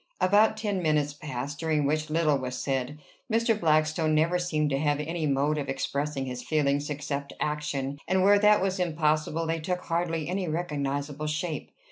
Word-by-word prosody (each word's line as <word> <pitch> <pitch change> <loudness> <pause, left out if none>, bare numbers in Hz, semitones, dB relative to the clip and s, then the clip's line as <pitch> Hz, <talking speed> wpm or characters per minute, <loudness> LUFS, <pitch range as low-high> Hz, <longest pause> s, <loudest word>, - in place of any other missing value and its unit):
About 210 +3 +4
ten 205 -4 -1
minutes 150 -3 +1
passed, 145 -1 -5
during 155 -3 +1
which 155 +2 0
little 155 -2 +2
was 125 -1 -4
said: 135 +1 -2 0.3
Mr. 225 -1 +2
Blackstone 155 0 +2
never 165 +3 +2
seemed 155 -4 0
to 135 - +1
have 145 -1 +1
any 160 +1 -2
mode 145 +2 +1
of 140 - -4
expressing 140 +1 -2
his 125 -1 -5
feelings 145 -1 0
except 140 -1 -4
action, 145 -2 -2
and 185 0 +2
where 205 +1 +6
that 210 -1 +5
was 190 0 -1
impossible 155 -1 0
they 165 0 -1
took 180 +3 -2
hardly 165 -2 -1
any 185 +1 -2
recognizable 145 -2 -2
shape. 155 +1 -3
155 Hz, 170 wpm, -27 LUFS, 145-170 Hz, 0.3 s, where